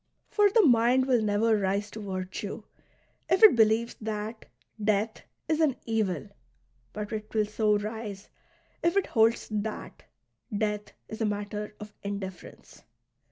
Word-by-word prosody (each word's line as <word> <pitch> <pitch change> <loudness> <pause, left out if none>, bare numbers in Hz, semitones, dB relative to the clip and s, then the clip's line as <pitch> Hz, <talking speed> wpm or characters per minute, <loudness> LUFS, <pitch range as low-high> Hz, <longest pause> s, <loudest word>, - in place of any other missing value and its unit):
For 415 -1 +5
the 435 +1 +5
mind 245 0 +4
will 250 -3 +3
never 215 +1 +2
rise 200 +1 -1
to 220 - -7
virtue 195 +2 -5 0.7
if 370 +4 +3
it 435 - +10
believes 225 +1 +3
that 215 +1 -4 0.4
death 215 +1 +1 0.3
is 315 0 +1
an 295 -5 +3
evil; 215 -4 -1 0.6
but 210 0 -5
it 215 -1 -5
will 215 -1 +3
so 210 0 +2
rise 210 -1 -6 0.5
if 340 +3 +2
it 395 - +3
holds 225 0 +2
that 215 0 -4 0.5
death 210 -1 -2
is 220 - -7
a - - +2
matter 210 0 -3
of 210 -1 -9
indifference. 195 -3 -7
215 Hz, 140 wpm, -28 LUFS, 205-230 Hz, 0.7 s, it